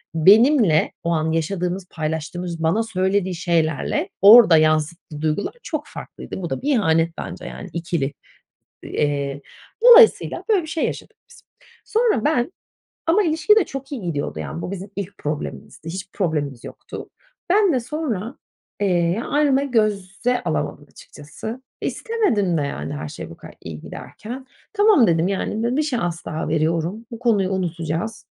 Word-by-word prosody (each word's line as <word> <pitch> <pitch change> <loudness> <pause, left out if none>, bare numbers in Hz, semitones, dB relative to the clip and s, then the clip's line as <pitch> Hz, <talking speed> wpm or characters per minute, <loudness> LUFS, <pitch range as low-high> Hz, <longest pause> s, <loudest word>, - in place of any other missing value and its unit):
benimle 205 - +5
o 170 - -1
an 160 -1 0
yaşadığımız, 180 +3 -2
paylaştığımız, 165 +2 -4
bana 180 +8 +2
söylediği 190 -3 0
şeylerle 165 -3 0
orada 205 -4 +9
yansıttığı 155 0 0
duygular 155 +5 -1
çok 310 -2 -4
farklıydı. - - -8
Bu 170 - -4
da 135 - -3
bir 290 +2 0
ihanet 165 -5 +2
bence - - -7
yani 195 - -8
ikili 165 -4 -2 0.7
Eee, 140 -1 -2 0.4
dolayısıyla, 485 -1 +7
böyle 415 -4 +4
bir - - -8
şey 325 0 -1
yaşadık - - -6
biz. - - -17 0.4
Sonra 445 - +1
ben 290 -1 +1 0.6
ama 350 +6 +4
ilişki 320 +4 +3
de 435 - +5
çok 275 +1 -8
iyi 270 -5 -4
gidiyordu, 165 -6 -3
yani 170 - -5
bu 180 - -5
bizim 195 +1 -7
ilk 200 -1 -6
problemimizdi, 150 +1 -6
hiçbir 185 +2 -6
problemimiz 150 - -1
yoktu. - - -9 0.4
Ben 395 -3 +4
de 255 - +2
sonra, 245 - -4 0.4
eee, 180 +1 +1
ayrılmayı 280 0 +1
göze 215 +2 0
alamadım 155 -2 -2
açıkçası. 220 - -9 0.2
İstemedim 230 - 0
de - - 0
yani 80 - -4
her 75 +1 -5
şey - - -8
bu - - -12
kadar - - -13
iyi 80 -2 -7
giderken. 250 +5 -9 0.3
"Tamam." 410 - +5
dedim 165 0 +2
"Yani, 220 +5 -1
bir 305 - +2
şans 175 - -2
daha 155 0 -3
veriyorum, 165 +7 -1
bu 230 - -7
konuyu 210 -6 +2
unutacağız." 175 +2 -3
190 Hz, 150 wpm, -22 LUFS, 160-245 Hz, 0.7 s, orada